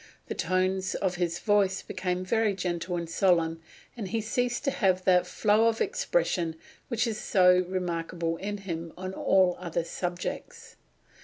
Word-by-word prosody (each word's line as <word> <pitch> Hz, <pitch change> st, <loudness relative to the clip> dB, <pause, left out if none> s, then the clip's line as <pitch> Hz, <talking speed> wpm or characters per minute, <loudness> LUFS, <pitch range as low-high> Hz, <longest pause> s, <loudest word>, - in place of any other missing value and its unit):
The -, -, -1 dB
tones 185 Hz, +1 st, 0 dB
of 185 Hz, -2 st, -1 dB
his 175 Hz, -1 st, -1 dB
voice 200 Hz, -3 st, +2 dB
become 185 Hz, -1 st, -3 dB
very 220 Hz, 0 st, +1 dB
gentle 180 Hz, -1 st, -2 dB
and 170 Hz, -1 st, -4 dB
solemn, 165 Hz, -2 st, +2 dB, 0.3 s
and 220 Hz, -5 st, -5 dB
he 225 Hz, +4 st, -1 dB
ceases 240 Hz, +3 st, -1 dB
to 275 Hz, -, 0 dB
have 185 Hz, -6 st, +1 dB
that 180 Hz, -1 st, +4 dB
flow 215 Hz, +4 st, +3 dB
of 225 Hz, -1 st, +1 dB
expression 395 Hz, -, 0 dB, 0.3 s
which 235 Hz, -1 st, 0 dB
is 220 Hz, -2 st, -2 dB
so 180 Hz, -1 st, +4 dB
remarkable 170 Hz, -2 st, -2 dB
in 205 Hz, +3 st, -4 dB
him 170 Hz, -4 st, -6 dB
on 185 Hz, +1 st, -5 dB
all 185 Hz, -2 st, +3 dB
other 170 Hz, -1 st, -2 dB
subjects." 175 Hz, +1 st, -5 dB
185 Hz, 155 wpm, -28 LUFS, 175-205 Hz, 0.3 s, that